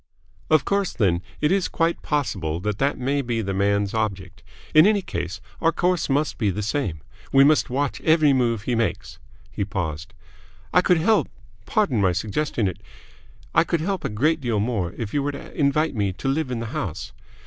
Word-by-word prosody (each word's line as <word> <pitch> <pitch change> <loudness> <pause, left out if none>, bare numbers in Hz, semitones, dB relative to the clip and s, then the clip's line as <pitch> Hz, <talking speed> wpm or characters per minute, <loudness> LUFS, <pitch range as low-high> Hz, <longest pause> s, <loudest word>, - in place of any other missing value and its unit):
"Of 155 -2 +4
course, 200 -1 0
then, 90 -6 +1 0.2
it 150 - +2
is 195 -1 +2
quite 165 0 0
possible 95 - -1
that 105 +1 -2
that 140 +1 +1
may 140 +3 0
be 120 -3 -2
the 95 -1 -2
man's 100 +1 +1
object. 100 -4 -3 0.3
In 155 +5 +8
any 210 -2 +2
case, 95 - -4 0.2
our 165 - +4
course 175 0 0
must 140 0 0
be 105 -4 +2
the 100 +3 -2
same. 100 - -2 0.3
We 135 0 +6
must 150 0 +4
watch 130 0 -1
every 155 -2 +4
move 115 -5 +1
he 125 - -1
makes." 115 -6 -2 0.3
He - - -2
paused. 85 -5 -4 0.6
"I 180 - +6
could 180 -1 +3
help 215 +7 +2 0.4
pardon 200 - +1
my 95 -2 +3
suggesting 110 - -1
it 90 - -5 0.7
I - - +5
could 170 -1 -1
help 195 +2 -2
a - - -1
great 150 +9 +1
deal 120 -5 0
more 105 -6 -1
if 110 -4 -5
you 145 - +1
were 145 +1 -2
to 140 - -9
invite 150 +2 +1
me 100 -5 -1
to 95 +8 -6
live 140 +1 0
in 120 -2 -3
the - - -3
house. 75 -10 -4
125 Hz, 195 wpm, -23 LUFS, 100-155 Hz, 0.7 s, In